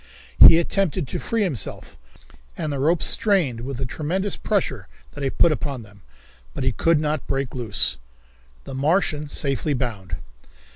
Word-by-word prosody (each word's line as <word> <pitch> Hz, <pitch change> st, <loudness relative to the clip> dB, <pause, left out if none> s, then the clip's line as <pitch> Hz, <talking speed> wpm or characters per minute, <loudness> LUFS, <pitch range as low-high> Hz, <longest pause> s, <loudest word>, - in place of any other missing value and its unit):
He 165 Hz, -, +10 dB
attempted 170 Hz, -2 st, 0 dB
to -, -, -3 dB
free 225 Hz, -2 st, -1 dB
himself, 155 Hz, -, -3 dB, 0.6 s
and 150 Hz, -2 st, -2 dB
the 140 Hz, -, -3 dB
ropes 160 Hz, +5 st, +2 dB
strained 175 Hz, -, +1 dB
with 130 Hz, +1 st, -5 dB
the 130 Hz, -, -3 dB
tremendous 180 Hz, -, -2 dB
pressure 135 Hz, -, -2 dB, 0.2 s
that 145 Hz, -, -8 dB
he 135 Hz, -, +1 dB
put 165 Hz, -, +3 dB
upon 140 Hz, -5 st, -3 dB
them, 100 Hz, -1 st, -18 dB, 0.5 s
but -, -, -3 dB
he 130 Hz, -, +2 dB
could 165 Hz, +5 st, +2 dB
not 150 Hz, -1 st, -2 dB
break 135 Hz, -1 st, -2 dB
loose. 110 Hz, -, +1 dB, 0.6 s
The -, -, -9 dB
Martian 150 Hz, +1 st, 0 dB
Safely 140 Hz, +1 st, -1 dB
Bound. 110 Hz, -8 st, -4 dB
145 Hz, 155 wpm, -23 LUFS, 130-165 Hz, 0.6 s, He